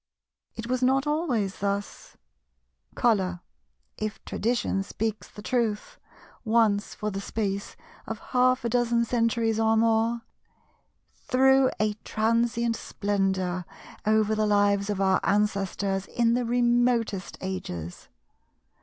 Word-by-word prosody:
It 225 Hz, -, -6 dB
was 250 Hz, +1 st, -1 dB
not 265 Hz, +2 st, +3 dB
always 275 Hz, -, -1 dB
thus. 200 Hz, +1 st, -4 dB, 0.8 s
Colour, 190 Hz, -7 st, +1 dB, 0.6 s
if 215 Hz, -1 st, -3 dB
Tradition 225 Hz, -3 st, -1 dB
speaks 215 Hz, +2 st, -3 dB
the 210 Hz, -, -12 dB
truth, 225 Hz, -3 st, -1 dB, 0.4 s
once 220 Hz, -3 st, +2 dB
for 210 Hz, 0 st, -3 dB
the 195 Hz, 0 st, -4 dB
space 200 Hz, -1 st, -3 dB, 0.3 s
of 225 Hz, -, -4 dB, 0.2 s
half 255 Hz, 0 st, +3 dB
a -, -, +1 dB
dozen 235 Hz, 0 st, +2 dB
centuries 230 Hz, -1 st, +1 dB
or 225 Hz, 0 st, +3 dB
more, 230 Hz, +1 st, +2 dB, 0.9 s
threw 265 Hz, +1 st, +3 dB
a 215 Hz, 0 st, +1 dB
transient 230 Hz, +1 st, +1 dB
splendour 190 Hz, -3 st, -1 dB, 0.4 s
over 215 Hz, 0 st, +2 dB
the 215 Hz, 0 st, +1 dB
lives 205 Hz, 0 st, +2 dB
of 205 Hz, -2 st, -1 dB
our 190 Hz, -1 st, +3 dB
ancestors 195 Hz, -1 st, 0 dB
in 235 Hz, -1 st, +1 dB
the 245 Hz, 0 st, 0 dB
remotest 240 Hz, -4 st, +1 dB
ages. 90 Hz, -, -6 dB
220 Hz, 115 wpm, -26 LUFS, 200-235 Hz, 0.9 s, not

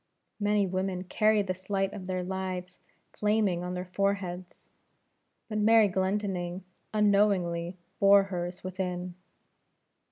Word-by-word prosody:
Many 205 Hz, -1 st, +2 dB
women 185 Hz, 0 st, -2 dB
carry 215 Hz, +2 st, +2 dB
this 185 Hz, 0 st, -6 dB
light 195 Hz, -1 st, 0 dB
of 190 Hz, -3 st, -7 dB
their 185 Hz, -1 st, -2 dB
lives 185 Hz, -1 st, -4 dB, 0.3 s
flaming 210 Hz, -4 st, +1 dB
on 180 Hz, 0 st, -4 dB
their 180 Hz, 0 st, -4 dB
foreheads; 185 Hz, -1 st, -3 dB, 0.8 s
but 215 Hz, -1 st, -2 dB
Mary 220 Hz, 0 st, +6 dB
Glendinning 190 Hz, -1 st, -1 dB, 0.3 s
unknowingly 195 Hz, -5 st, +2 dB, 0.2 s
bore 200 Hz, 0 st, +7 dB
hers 180 Hz, -2 st, -5 dB
within. 180 Hz, -1 st, -4 dB
190 Hz, 115 wpm, -29 LUFS, 180-200 Hz, 0.8 s, bore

